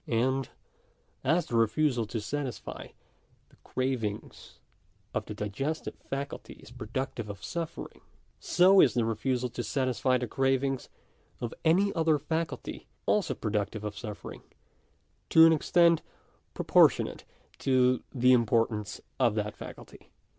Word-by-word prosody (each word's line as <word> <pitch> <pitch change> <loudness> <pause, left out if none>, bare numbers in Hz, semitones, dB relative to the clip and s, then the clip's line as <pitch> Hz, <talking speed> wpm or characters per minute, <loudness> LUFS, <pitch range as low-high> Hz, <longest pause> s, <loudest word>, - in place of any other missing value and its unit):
And 130 +3 0 0.7
as 165 +6 +2
the 120 - -4
refusal 115 +1 +2
to 115 - -3
satisfy 135 +3 -5 0.6
the - - -23
cravings 125 -5 -4 0.6
of - - -2
the 105 - -6
diges 110 +10 -2
tive - - -5
faculty 140 +1 -6
is - - -16
productive 115 0 -4
of 100 -1 -8
suffering, 165 +11 -5 0.4
so 185 +3 +5
is 130 - +4
the 120 -2 +2
refusal 125 +3 -1
to 120 - -5
satisfy 130 +1 +1
the 125 - -2
cravings 135 +1 0 0.5
of 120 - -4
any 190 +5 +3
other 160 -2 +2
faculty 160 +3 -4 0.2
also 210 -5 +1
productive 105 -1 -2
of 105 -1 -4
suffering, 105 -4 -8 0.9
to 160 0 +8
an 165 - +7
extent 170 +1 +4 0.5
proportionate - - +3 0.4
to 130 -1 +3
the 125 -1 +4
importance 115 -3 +1 0.2
of 120 -4 +3
that 105 -1 -2
faculty. - - -11
130 Hz, 125 wpm, -29 LUFS, 115-145 Hz, 0.9 s, to